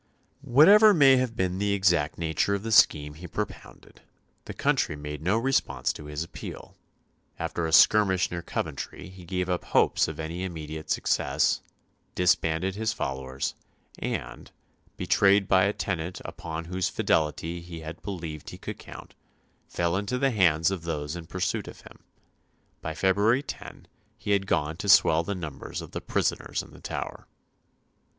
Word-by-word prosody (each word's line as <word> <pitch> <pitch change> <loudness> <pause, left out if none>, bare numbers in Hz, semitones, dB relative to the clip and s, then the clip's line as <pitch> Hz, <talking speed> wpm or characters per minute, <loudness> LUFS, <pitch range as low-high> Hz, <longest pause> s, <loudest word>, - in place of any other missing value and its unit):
Whatever 190 - +7
may 135 -4 +7
have 125 -3 -1
been 95 -2 -1
the 100 0 +1
exact 85 -6 +2
nature 85 +4 0
of 100 - -5
the 115 - -4
scheme 75 -8 +4
he 85 +4 -10
propounded, 105 +4 -7 0.4
the - - -7
country 75 - +1
made 75 0 -7
no 95 +7 +1
response 115 - 0
to 75 - -10
his 75 +1 -4
appeal; 85 - -9 0.6
after 85 -1 -2
a - - -4
skirmish 95 0 +5
near 85 -1 -3
Coventry 85 - -5
he 90 -1 -13
gave 90 +1 -2
up 90 -1 -1
hopes - - +2
of - - -7
any 80 +3 -4
immediate 80 -3 -6
success, - - +1 0.5
disbanded 90 0 +1
his 110 +2 -1
followers, 65 0 -3 0.5
and, - - -5 0.5
betrayed 100 0 +3
by 95 0 +4
a 100 - +2
tenant 90 -4 -3
upon 80 0 -6
whose 90 +2 -1
fidelity 80 +1 0
he 85 -1 -9
had 80 +1 -8
believed 85 -6 -6
he - - -9
could - - -7
count, - - -11 0.5
fell 85 0 -1
into 100 +6 -1
the 135 +1 +2
hands 85 -5 +3
of 95 -3 -3
those 75 -2 -4
in 85 -2 -8
pursuit 95 +3 -2
of - - -11
him. - - -15 0.8
By - - -5
February 105 +7 +2
10 - - -9 0.3
he 105 - -4
had 100 -1 +2
gone 80 -2 0
to 100 +2 -4
swell 85 -4 +6
the 100 +4 -4
numbers 80 -6 -6
of - - -9
the - - -5
prisoners - - -1
in - - -15
the - - -15
Tower. - - -6
90 Hz, 160 wpm, -27 LUFS, 80-100 Hz, 0.8 s, Whatever